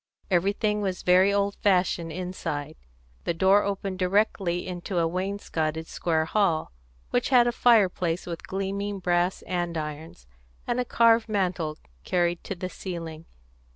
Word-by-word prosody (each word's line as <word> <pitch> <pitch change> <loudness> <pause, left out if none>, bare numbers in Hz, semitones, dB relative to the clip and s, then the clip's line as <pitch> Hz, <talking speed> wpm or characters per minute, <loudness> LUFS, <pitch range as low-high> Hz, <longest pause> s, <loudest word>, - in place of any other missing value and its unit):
Everything 205 +4 +1
was 190 -3 -2
very 185 +2 +5
old 200 0 +1
fashioned 180 -4 +1
inside. 160 -4 -4 0.5
The 170 - 0
door 190 +4 +5
opened 195 -2 -3
directly 185 -2 +1
into 180 +1 -4
a 165 -1 +3
wainscoted 165 -4 -2
square 160 -1 0
hall, 170 -3 +1 0.4
which 245 - +1
had 250 -3 +6
a - - +3
large 240 - -5
fireplace 185 -7 +3
with 170 -2 -6
gleaming 200 +1 -3
brass 180 0 0
andirons, 160 - -4 0.4
and 240 - -1
a 250 - 0
carved 230 -1 +4
mantel 180 -6 -1 0.3
carried 175 -1 0
to 195 - -4
the 185 +1 -4
ceiling. 165 -4 -7
185 Hz, 140 wpm, -26 LUFS, 170-200 Hz, 0.5 s, had